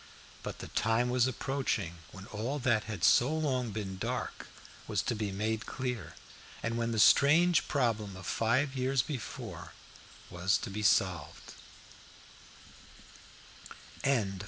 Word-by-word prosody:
But -, -, -6 dB
the -, -, -8 dB
time 115 Hz, +3 st, +1 dB
was 125 Hz, 0 st, +3 dB
approaching 125 Hz, -10 st, -2 dB
when 95 Hz, 0 st, -10 dB
all 115 Hz, +8 st, -3 dB
that 120 Hz, -6 st, +1 dB
had 105 Hz, -6 st, -6 dB
so 120 Hz, -, +5 dB
long 130 Hz, -6 st, 0 dB
been 100 Hz, -3 st, -5 dB
dark -, -, -4 dB, 0.4 s
was -, -, 0 dB
to -, -, -1 dB
be 105 Hz, -3 st, -2 dB
made 110 Hz, +3 st, -2 dB
clear, 120 Hz, -11 st, -4 dB, 0.5 s
and 115 Hz, 0 st, -1 dB
when 115 Hz, 0 st, -1 dB
the 115 Hz, -, -2 dB
strange 160 Hz, -, +5 dB
problem 110 Hz, -8 st, 0 dB
of 95 Hz, -, -10 dB
five 130 Hz, +8 st, +1 dB
years 130 Hz, -1 st, +1 dB
before 135 Hz, -7 st, -6 dB, 0.6 s
was 90 Hz, +2 st, +2 dB
to 115 Hz, -, -6 dB
be 105 Hz, +2 st, -4 dB
solved. 90 Hz, -7 st, +1 dB
115 Hz, 130 wpm, -31 LUFS, 100-130 Hz, 0.6 s, so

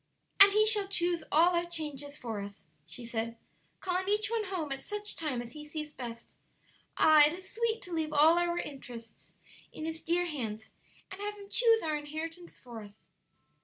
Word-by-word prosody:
"And 395 Hz, 0 st, +10 dB
He 425 Hz, +1 st, +5 dB
shall 425 Hz, -2 st, +3 dB
choose 350 Hz, -3 st, +1 dB
all 340 Hz, +4 st, +5 dB
our 345 Hz, 0 st, +1 dB
changes 295 Hz, -4 st, -4 dB
for 225 Hz, -4 st, -5 dB
us," 200 Hz, 0 st, -9 dB, 0.2 s
she 200 Hz, +9 st, -7 dB
said, 230 Hz, 0 st, -3 dB, 0.4 s
"calling 375 Hz, +1 st, -1 dB
each 420 Hz, +1 st, +2 dB
one 450 Hz, -2 st, 0 dB
home 355 Hz, -7 st, -3 dB
at 270 Hz, -, -3 dB
such 415 Hz, 0 st, -5 dB
time 275 Hz, -7 st, -2 dB
as 235 Hz, -, -10 dB
He 300 Hz, +3 st, -9 dB
sees 300 Hz, 0 st, -6 dB
best. 235 Hz, -3 st, -8 dB, 0.6 s
Ah, 310 Hz, -1 st, +7 dB
it 305 Hz, -, -2 dB
is 375 Hz, +1 st, -12 dB
sweet 460 Hz, 0 st, -1 dB
to 360 Hz, -, -7 dB
leave 315 Hz, -2 st, -1 dB
all 310 Hz, +3 st, +6 dB
our 345 Hz, 0 st, 0 dB
interests 245 Hz, -7 st, -8 dB, 0.4 s
in 310 Hz, -, -6 dB
His 320 Hz, 0 st, -4 dB
dear 345 Hz, +2 st, +1 dB
hands, 225 Hz, -9 st, -5 dB, 0.4 s
and 385 Hz, +1 st, -8 dB
have 415 Hz, 0 st, -3 dB
Him 400 Hz, -1 st, -12 dB
choose 455 Hz, -2 st, +4 dB
our 310 Hz, -2 st, 0 dB
inheritance 320 Hz, +4 st, -6 dB
for 235 Hz, -3 st, -10 dB
us!" 205 Hz, 0 st, -13 dB
320 Hz, 190 wpm, -31 LUFS, 270-375 Hz, 0.6 s, And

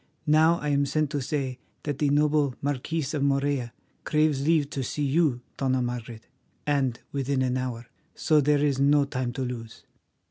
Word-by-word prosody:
Now 160 Hz, +2 st, +4 dB
I 150 Hz, -, -3 dB
am 140 Hz, 0 st, +2 dB
sent 155 Hz, 0 st, 0 dB
to 145 Hz, -2 st, -1 dB
say 130 Hz, -2 st, -3 dB, 0.2 s
that 145 Hz, -2 st, -3 dB
the 145 Hz, -, +2 dB
noble 145 Hz, -2 st, +2 dB
Marquis 145 Hz, +3 st, -2 dB
of 150 Hz, -, -1 dB
Morella 140 Hz, -3 st, 0 dB, 0.3 s
craves 150 Hz, -3 st, +2 dB
leave 155 Hz, -1 st, +3 dB
to 135 Hz, -, -3 dB
see 145 Hz, +3 st, -3 dB
you, 140 Hz, -3 st, +2 dB, 0.2 s
Dona 130 Hz, -2 st, +1 dB
Margaret, 120 Hz, -2 st, -5 dB, 0.4 s
and 135 Hz, -5 st, 0 dB
within 135 Hz, -1 st, 0 dB
an 125 Hz, -1 st, 0 dB
hour. 125 Hz, -2 st, -3 dB, 0.3 s
So 155 Hz, -1 st, +3 dB
there 145 Hz, +1 st, +3 dB
is 140 Hz, -2 st, +1 dB
no 140 Hz, +1 st, +4 dB
time 130 Hz, -3 st, -3 dB
to 130 Hz, -, -3 dB
lose." 120 Hz, -3 st, -7 dB
140 Hz, 175 wpm, -26 LUFS, 130-150 Hz, 0.4 s, Now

